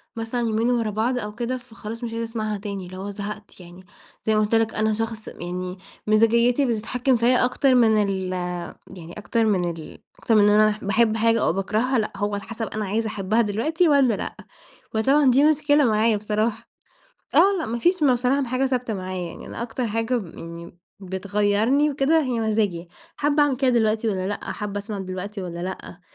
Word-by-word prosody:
مثلًا 225 +2 -3
يومين 225 0 +1
ورا 230 -3 0
بعض 225 +5 0
أو 210 -2 -6
كده 240 +2 -2
فخلاص 230 -1 -9
مش 235 - -3
عايزة 230 0 -3
أسمعها 215 -2 -3
تاني، 200 -2 -6
اللي 185 +1 -9
هو 195 +2 -5
زهقت 205 +1 -7
يعني، 180 +1 -13 0.4
زي 220 - +1
ما 215 - +3
قُلت 215 +2 +1
لك، 225 -1 +2
أنا 220 0 +1
شخص 225 0 -4
يعني 180 +1 -5 0.3
مزاجيّتي 235 +5 +3
بتتحكم 245 +2 0
فيَّ 240 +2 +3
أكتر 255 +1 +3
من 220 -3 +4
ال 190 -2 -2 0.6
يعني 170 0 -10
أكتر 225 +2 0
من 185 -5 +1
ال 160 -2 -9 0.2
أكتر 225 - +1
من 205 -1 +6
أنا 215 +1 +5
ح 210 - -5
باحب 220 +2 +2
حاجة 230 0 +2
أو - - +2
باكرهها، 220 +7 0
لأ، 215 - -2
هو 205 0 -1
على 200 0 -3
حسب 225 -1 -5
أنا 215 -1 -4
عايزة 220 +3 -1
أحبها 210 +2 0
دلوقتي 305 - +1
والّا 275 -5 +4
لأ، - - -5 0.6
وطبعًا 270 +5 +4
دي 270 +3 +4
مشكلة 295 -1 +3
معايا 220 -1 +3
بصراحة. 215 +2 -2 0.7
آه، 400 - +6
لأ 325 - -3
ما 235 +2 -3
فيش 350 +7 +2
م 280 -3 +5
بصراحة 255 +3 +1
حاجة 255 +2 0
ثابتة 250 -4 -2
معايا 185 -2 -4
يعني - - -10
أنا - - -6
أكتر 240 +1 -3
حاجة 225 +3 -1 0.2
يعني 170 +1 -10 0.2
بتغيَّرني 205 +8 +1
وكده 290 +3 +2
هي 250 -4 -1
مزاجي، 210 -6 -1 0.3
حابة 295 +1 +2
أعمل 285 -3 +2
كده 260 0 +2
دلوقتي 225 -1 +1
والّا 190 -3 -1
لأ، 205 - -3
حابة 205 -1 -4
أسمع 205 0 -5
دلوقتي 190 +2 -5
والّا 170 -2 -6
لأ، 185 -1 -7
220 Hz, 195 wpm, -23 LUFS, 205-245 Hz, 0.7 s, من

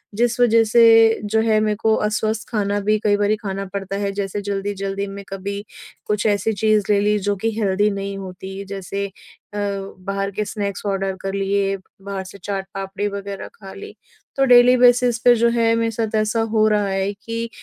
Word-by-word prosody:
जिस 240 +2 +1
वज़ह 230 -2 +5
से 225 0 +5
जो 220 +2 +1
है 220 -1 +3
मेरे 215 -1 +1
को 220 0 +3
अस्वस्थ 215 +1 -2
खाना 205 -3 0
भी 215 +1 +2
कई 205 -1 +3
बारी 205 +1 +2
खाना 195 -1 -3
पड़ता 195 -1 -4
है। 200 0 -1
जैसे 200 0 -3
जल्दी-जल्दी 200 0 -3
मैं 200 0 -8
कभी 200 +1 -5 0.4
कुछ 210 0 -1
ऐसी 205 +1 +1
चीज़ 215 0 +2
ले 205 - +4
ली 210 +1 +2
जो 205 +1 -1
कि 225 +4 -1
हेल्दी 205 0 +2
नहीं 200 0 -4
होती। 190 +1 -7
जैसे 195 0 -4
अ, - - -15 0.5
बाहर 195 -1 -3
के 210 +2 -3
स्नैक्स 200 -2 -4
ऑर्डर 195 -1 -1
कर 195 0 -4
लिए, 195 0 0 0.2
बाहर 195 -1 -5
से 185 - -11
चाट 195 -1 -3
पापड़ी 195 +1 -3
वग़ैरह 200 -1 -6
खा 195 -2 -11
ली। 420 0 -10 0.4
तो 270 - +3
डेली 245 0 +7
बेसिस 245 -1 +4
पे 245 +1 +6
जो 235 +1 +3
है 230 -1 +2
मेरे 230 0 0
साथ 220 -1 -2
ऐसा 215 +1 +1
हो 215 -1 +3
रहा 210 -1 +1
है 195 +1 -1
कि 230 +3 -5
205 Hz, 195 wpm, -21 LUFS, 195-220 Hz, 0.5 s, डेली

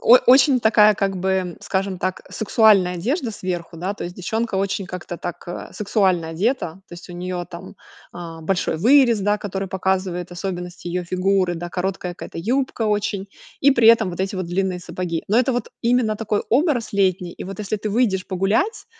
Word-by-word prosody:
о 240 - +8
очень 260 +1 +6
такая, 215 -1 +5
как 195 -1 -1
бы, 185 -1 -1
скажем 190 -1 -2
так, 185 +1 -2
сексуальная 210 -4 +4
одежда 240 - -1
сверху, 175 -4 -5
да. 185 +5 -3
То - - -6
есть 175 - -6
девчонка 220 +4 -2
очень 195 0 -1
как-то 180 -1 -6
так, 175 0 -7
а, 175 - -7
сексуально 190 -5 +1
одета. 175 +1 -1
То - - -16
есть 175 - -12
у - - -7
нее 180 0 -4
там, 175 +2 -9 0.4
а, 165 -2 -8
большой 180 +1 -1
вырез, 240 - +5
да, 205 +1 +1
который 195 -1 -4
показывает 185 -2 -1
особенности 180 -1 -6
ее 180 +1 -2
фигуры, 185 0 +1
да, 175 +1 -5
короткая 180 0 -3
какая-то - - -8
юбка 250 +6 -1
очень, 210 -2 -1 0.3
и 280 - +6
при 235 -3 +5
этом 220 -4 +5
вот 175 - -6
эти 190 0 -2
вот 185 - -3
длинные 185 +1 -1
сапоги. 175 -2 -4
Но 210 - +1
это 255 +1 +2
вот 245 -2 -2
именно 235 -2 +2
такой 210 -1 -1
образ 260 -4 +1
летний. 185 -3 +1
И - - -9
вот, 195 0 -7
если 210 0 -2
ты 210 +1 -4
выйдешь 200 -4 +1
погулять 200 - 0
190 Hz, 190 wpm, -21 LUFS, 180-220 Hz, 0.4 s, о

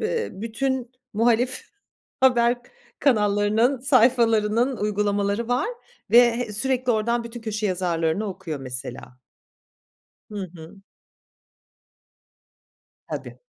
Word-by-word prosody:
be 465 -1 -1
bütün 255 +2 -2 0.2
muhalif 235 +3 +1 0.6
haber 240 -2 +4 0.4
kanallarının 215 +1 +2
sayfalarının 240 -1 +3
uygulamaları 205 +1 0
var 245 - +1 0.4
ve, 235 - +7
eee, 240 -2 +4
sürekli 255 +2 +1
oradan 235 +2 0
bütün 235 0 -8
köşe 215 -1 -3
yazarlarını 175 +1 0
okuyor 170 -6 -6
mesela. 125 -1 -7 1.1
Hı 200 -3 -5
hı. 165 +3 -12 2.3
Tabii. - - -7
225 Hz, 90 wpm, -24 LUFS, 200-245 Hz, 2.3 s, ve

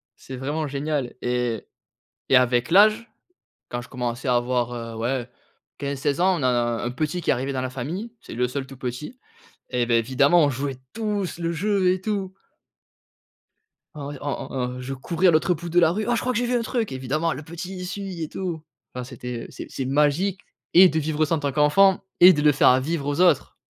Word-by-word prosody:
c'est 130 - -9
vraiment 150 +4 -2
génial 140 -2 -2
et 125 -2 -1 0.6
et - - +7
avec 125 +1 +3
l'âge, 215 +5 +5 0.6
quand 120 - -4
je - - -13
commençais 125 +1 -4
à 125 - +4
avoir, 120 0 0
heu, 115 -1 -6
ouais, 120 +2 -2 0.5
15-16 140 +2 -2
ans, 185 -1 +3
on 140 - -3
a - - +4 0.4
un 120 - -1
petit 155 +6 -2
qui - - 0
est - - +5
arrivé 135 +3 -2
dans 130 - -2
la 130 0 -3
famille, 170 - -5
c'est - - -10
le 125 +2 +1
seul 130 +2 -4
tout 135 - -11
petit. 130 - -6 0.5
Et 125 -2 0
beh, 115 -1 +3
évidemment, 140 +8 +4
on 145 - +3
jouait 135 0 -3 0.2
tous 210 -5 -2
le 170 -1 -2
jeu 190 +2 +1
et 185 - -4
tout. 195 -2 -3 1.6
En 145 -2 -6
ouais, 145 -1 -7
en 145 - -4
en - - -5 0.2
en - - -7
je 130 +2 -5
courais 170 +7 +1
à - - +8
l'autre 170 +3 +2
bout 170 +2 -7
de 170 +1 +1
la 165 -2 +5
rue: 210 +5 -1
«Oh, 240 - +3
je 230 - 0
crois 255 - -1
que 235 - 0
j'ai 245 - 0
vu 250 - -1
un 235 - 0
truc!» 230 - -2
évidemment 140 +6 -1
le 150 - -6
petit, 170 +4 -7
il 180 0 -5
suit 185 -2 -5
et 155 - -3
tout. 170 -3 -4 0.3
Enfin, 125 - -4
c'était 125 -1 -7
c'est - - -8
c'est 135 - -4
magique 150 +8 +1 0.3
et 185 +1 +9
de 160 - -1
vivre 155 0 0
ça 165 +2 0
en - - -2
tant 140 -2 -2
qu'enfant 185 +6 +4 0.2
et 180 +1 +10
de 150 -4 -1
le 150 -1 +5
faire 135 - +4
à 130 +1 +5
vivre 150 0 -2
aux 145 +4 -1
autres. 175 -6 +3
150 Hz, 225 wpm, -24 LUFS, 130-180 Hz, 1.6 s, et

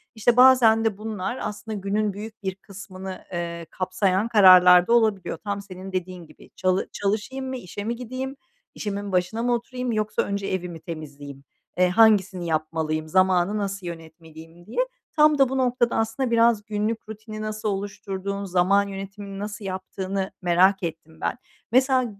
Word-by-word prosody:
İşte, 235 +2 +2
bazen 240 -4 +6
de 210 -3 0
bunlar 215 +1 -4
aslında 215 0 -5
günün 200 +1 -1
büyük 215 +1 -9
bir 190 -1 -2
kısmını, 190 -1 -9
eee, 170 -1 -4
kapsayan 190 +2 0
kararlar 180 -4 +7
da 235 - +3
olabiliyor. 215 -7 +2
Tam 200 -1 -3
senin 190 -1 -9
dediğin 180 -2 -4
gibi, - - -18
“Çalı 185 0 0
çalışayım 220 +7 -2
mı, 260 - -3
işe 205 -1 -7
mi 235 +2 -2
gideyim, 255 +3 -5 0.4
işimin 205 -1 -4
başına 185 +6 0
mı 245 0 +2
oturayım, 250 +1 -3
yoksa 215 -1 0
önce 200 0 -3
evi 180 -1 -2
mi 165 -1 -8
temizleyeyim? 145 -4 -9 0.3
Eee, 180 0 +4
hangisini 190 -4 +4
yapmalıyım, 155 0 -1
zamanı 185 +3 +2
nasıl 195 -2 -3
yönetmeliyim?” 165 0 -11
diye. 225 - -5 0.4
Tam 300 -1 +5
da 270 -2 +4
bu 265 - -2
noktada, 245 -2 +1
aslında, 235 +3 -1
biraz 230 -2 +3
günlük 215 +1 -3
rutini 215 0 -8
nasıl 215 0 -3
oluşturduğunu, 200 0 -4
zaman 190 +3 +3
yönetimini 195 0 -7
nasıl 205 0 -6
yaptığını 190 +1 -4
merak 180 +2 +3
ettim 160 -1 -6
ben. - - -1 0.3
Mesela, 260 0 +3
200 Hz, 155 wpm, -24 LUFS, 185-220 Hz, 0.4 s, kararlar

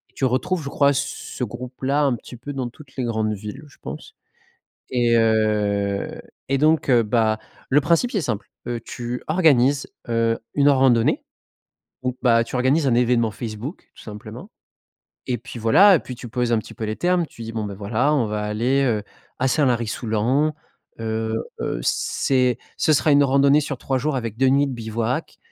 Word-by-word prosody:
tu 135 - 0
retrouves, 130 +8 0
je 140 - -5
crois, 140 0 +3
ce 140 -1 -4
groupe-là, 130 +5 -2
un 135 -4 +2
petit 125 - -11
peu 145 +4 -7
dans 130 -3 -3
toutes 135 +1 -17
les 130 - -1
grandes 110 -2 -1
villes, 105 +8 -7
je 140 - -20
pense. - - -8 0.7
Et 120 -2 +2
heu, 105 -3 +1 0.3
et 135 - +2
donc 155 0 +2
heu, 120 -3 +5
bah, 110 0 +1 0.3
le 145 +2 +4
principe, 170 - +2
c'est 205 - 0
simple, 115 -7 -3 0.2
heu, 120 -1 -2
tu 120 +1 -6
organises, 145 -5 +3 0.2
heu, 115 0 +1 0.2
une 145 0 +5
randonnée 130 -4 +3 0.8
ou 125 0 -2
bah, 115 -2 +4
tu - - -10
organises 135 +5 +2
un 125 - +3
événement 120 -2 +2
Facebook, 115 - -7
tout - - -14
simplement 110 +2 -9 0.8
et 125 -2 0
puis 115 +1 -9
voilà, 190 - +6
et - - +5
puis 125 - -8
tu 125 - -9
poses 120 +1 -1
un 115 - +3
petit - - -8
peu - - -9
les 110 0 -3
termes. 175 -1 +1
Tu 115 - -12
dis: 115 0 -6
«Bon, 110 -1 -3
bah, 100 -1 -5
voilà, 110 +9 0
on 125 -7 +2
va 105 0 -3
aller, 120 +6 +1
heu, 110 -5 0 0.3
à 130 - +1
Saint-Lary-Soulan. 125 +2 +1 0.5
Heu, 110 0 -2 0.3
heu, - - -2
c'est 125 - +1 0.2
ce 155 - +2
sera 150 +1 +3
une 145 - +6
randonnée 140 +2 +4
sur 140 -3 -4
3 135 0 -1
jours 145 0 -1
avec 115 -4 -4
2 130 +2 +3
nuits 140 +2 +3
de 135 - -4
bivouac, 115 +4 -3
125 Hz, 185 wpm, -22 LUFS, 110-140 Hz, 0.8 s, voilà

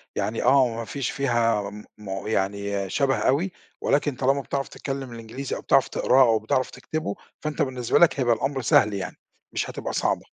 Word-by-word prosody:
يعني 105 +2 -1
آه، 130 +1 +5
ما 115 0 -4
فيش 135 +2 -3
فيها 115 -6 +1
م 105 +1 -10
م 95 -2 -6
يعني 100 -1 -1
شبه 135 +2 +1
أوي، 140 - +1 0.3
ولكن 145 -1 +1
طالما 135 +2 +1
بتعرف 135 0 -3
تتكلم 135 -2 -5
الإنجليزي 115 +4 -5
أو - - -6
بتعرف - - +4
تقراه 130 +1 +3
أو 115 -3 +3
بتعرف 120 +4 0
تكتبه، 155 -11 -4 0.2
فأنت 155 -1 -3
بالنسبة 125 -3 +1
لك 170 -5 +5
هيبقى 120 -2 +3
الأمر 135 +4 -2
سهل 105 -2 +4
يعني، 100 -1 -4 0.4
مش - - -2
هتبقى - - -5
صعبة. - - 0
120 Hz, 180 wpm, -25 LUFS, 105-135 Hz, 0.4 s, آه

